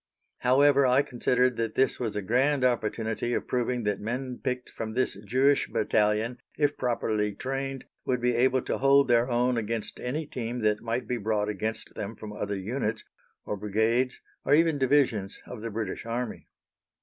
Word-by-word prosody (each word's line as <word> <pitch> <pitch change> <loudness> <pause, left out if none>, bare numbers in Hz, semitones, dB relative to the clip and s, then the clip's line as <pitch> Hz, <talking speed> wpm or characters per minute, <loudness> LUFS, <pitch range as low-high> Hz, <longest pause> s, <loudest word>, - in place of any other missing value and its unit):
However, 140 +2 +5
I 130 +3 +4
considered 125 0 +1
that 115 -1 -2
this 135 - +2
was 115 -4 -2
a 105 - -2
grand 130 +6 +2
opportunity 115 -1 0
of - - -3
proving 125 -1 0
that 105 -2 0
men 125 +3 -4
picked 125 -2 -3
from 110 0 -5
this 130 - +1
Jewish 135 +4 +3
Battalion, 110 +3 +1 0.2
if 145 -1 +2
properly 110 -4 -1
trained, 135 +2 -4 0.2
would 125 -1 0
be 120 0 +1
able 130 +1 +3
to - - -2
hold 140 +1 +5
their 120 +1 +3
own 120 0 +2
against 115 0 -3
any 145 +6 -3
team 120 -2 -4
that 105 -1 +1
might 115 +2 -2
be 125 - -1
brought 105 -1 0
against 110 +2 -3
them 105 +3 -5
from 105 0 -8
other 105 -1 -3
units, 110 +2 -2 0.4
or - - -2
brigades, 110 +5 0 0.2
or 145 - +4
even 160 -2 +3
divisions, 125 -7 +2
of 125 -4 -8
the 115 - -4
British 110 -2 -4
Army. 120 0 -4
120 Hz, 175 wpm, -28 LUFS, 110-130 Hz, 0.4 s, However